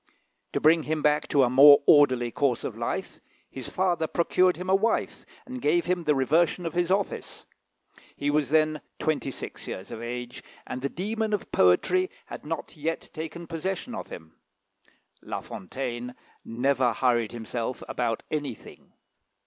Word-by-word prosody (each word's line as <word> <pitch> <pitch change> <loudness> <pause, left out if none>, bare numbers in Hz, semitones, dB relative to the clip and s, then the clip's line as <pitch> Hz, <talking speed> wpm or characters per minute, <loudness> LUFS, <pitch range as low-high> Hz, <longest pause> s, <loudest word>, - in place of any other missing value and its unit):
To - - +1
bring 160 +2 +5
him 155 -1 -1
back 150 0 +2
to 140 - +3
a 125 - +3
more 140 +2 +8
orderly 130 -5 +5
course 130 -3 0
of - - -4
life, - - -4 0.3
his 130 -2 -7
father 175 -3 0
procured 180 +2 +2
him 180 +1 -6
a 190 - +2
wife, 215 +4 0 0.2
and 255 -1 -7
gave 170 +3 +2
him 180 -2 -1
the 150 - +3
reversion 160 +6 +2
of 165 - -3
his 175 0 0
office. 195 +1 -2 0.7
He 145 +1 -1
was 145 -3 +1
then 155 0 +2 0.2
twenty 155 -3 -1
six 130 - -8
years 95 - -7
of 110 - -6
age, 125 +1 -6 0.2
and 130 - -5
the 140 - -1
demon 215 +5 -2
of 205 - -3
poetry 180 - +3 0.2
had - - -9
not 165 -1 -5
yet 160 +2 -4
taken 165 +2 -6
possession 185 +8 -4
of - - -6
him. 80 0 -11 0.9
La - - -5
Fontaine 125 +4 -6 0.3
never 125 +1 +1
hurried 120 -2 +1
himself 120 +1 -4
about 115 -2 -2
anything. 145 -7 -6
150 Hz, 160 wpm, -26 LUFS, 125-175 Hz, 0.9 s, more